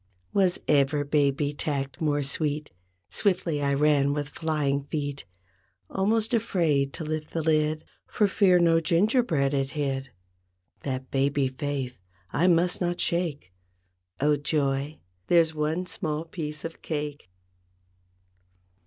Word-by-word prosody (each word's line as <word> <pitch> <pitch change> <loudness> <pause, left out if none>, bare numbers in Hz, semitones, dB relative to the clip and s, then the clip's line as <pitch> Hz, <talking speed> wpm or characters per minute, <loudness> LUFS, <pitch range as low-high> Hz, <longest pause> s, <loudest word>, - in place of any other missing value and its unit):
Was 185 -3 +2
ever 145 0 +3
baby 145 0 +1
tact 140 +1 -3
more 145 -2 +1
sweet? 150 +1 0 0.4
Swiftly 180 -7 0
I 140 0 +1
ran 140 -1 +3
with 145 -1 -3
flying 145 -3 -1
feet. 145 -2 -4 0.6
35 - - -6
Almost 220 +3 +2
afraid 165 -11 +1
to - - -6
lift 155 0 -3
the 165 - -1
lid 155 0 +1 0.2
For 210 - +2
fear 190 -2 +4
no 165 -1 +4
gingerbread 170 - +2
it 135 -1 0
hid. 135 -2 -2 0.7
That 130 -1 -4
baby 135 0 +1
faith, 130 -3 -4 0.3
I 175 - +3
must 175 +1 +3
not 175 0 -1
shake— 160 - -1 0.7
Oh 150 +1 +3
joy, 140 0 -1 0.3
there's 165 -2 +4
one 155 +4 -1
small 160 -3 -3
piece 155 -2 -5
of 165 - -7
cake! 145 - -4
150 Hz, 125 wpm, -27 LUFS, 140-165 Hz, 0.7 s, fear